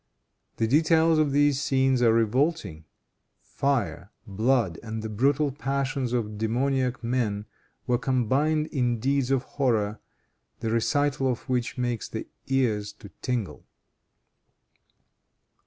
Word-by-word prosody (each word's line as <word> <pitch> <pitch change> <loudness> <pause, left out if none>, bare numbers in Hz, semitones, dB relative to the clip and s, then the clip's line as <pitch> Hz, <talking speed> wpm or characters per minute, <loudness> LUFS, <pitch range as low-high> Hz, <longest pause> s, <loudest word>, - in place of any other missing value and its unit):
The 115 - +1
details 160 +5 +4
of 150 -2 +2
these 145 -1 +3
scenes 135 -3 +2
are 115 -2 +5
revolting. 115 - 0 0.5
Fire, 100 - -2 0.2
blood 110 -2 +1
and 110 -1 -5
the 110 - -4
brutal 140 +7 +1
passions 135 -1 -2
of 110 -4 -2
demoniac 125 +3 0
men 115 -4 -1 0.4
were 120 -1 +1
combined 135 +5 +1
in 120 -4 0
deeds 135 +1 0
of 135 -2 +1
horror, 110 -7 0 0.6
the 110 - -2
recital 140 +4 +1
of 125 - -6
which 125 -2 -1
makes 120 -3 -2
the - - -5 0.2
ears 110 -6 0
to 100 - -13
tingle. 115 - -3
125 Hz, 120 wpm, -26 LUFS, 110-140 Hz, 0.6 s, are